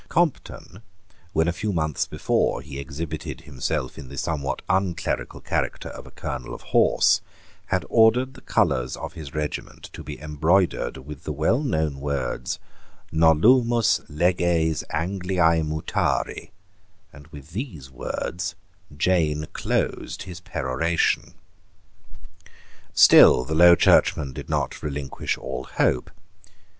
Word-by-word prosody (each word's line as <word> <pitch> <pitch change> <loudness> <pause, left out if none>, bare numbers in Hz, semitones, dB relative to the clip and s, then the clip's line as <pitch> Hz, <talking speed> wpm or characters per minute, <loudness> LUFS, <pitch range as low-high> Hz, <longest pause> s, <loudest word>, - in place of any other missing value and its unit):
Compton, 145 - -1 0.5
when 80 0 +1
a 85 - +1
few 105 +4 -2
months 75 -4 -1
before - - 0
he 70 -2 -8
exhibited 75 +3 -6
himself 65 -2 -3
in 65 - -10
the 70 - -9
somewhat 70 -3 -2
unclerical 95 -3 -1
character - - -2
of - - -10
a - - -11
colonel 65 - -6
of - - -12
horse, - - +4 0.5
had - - 0
ordered 120 +4 +4
the 130 - -14
colours 65 0 0
of - - -7
his 75 -3 -9
regiment 75 -1 -5
to - - -8
be 75 0 -8
embroidered 80 +5 +1
with 75 -1 -9
the - - -4
well 80 - +1
known 80 - -1
words 70 -3 -3 0.5
"Nolumus 115 +10 +4
leges 85 -1 +1
Angliae 90 0 +1
mutari"; 80 0 -2 0.6
and 75 0 -14
with 70 0 -12
these 85 - -6
words 85 +7 -4 0.4
Jane 80 -3 +1
closed - - -2
his 90 -3 -9
peroration, 80 +1 -1 1.6
Still 65 - +7
the 75 - -3
Low 85 +2 +8
Churchmen 70 -4 +3
did 70 0 -8
not - - -2
relinquish 70 -3 -3
all 65 +1 -5
hope. 60 - 0
80 Hz, 125 wpm, -24 LUFS, 70-90 Hz, 1.6 s, Low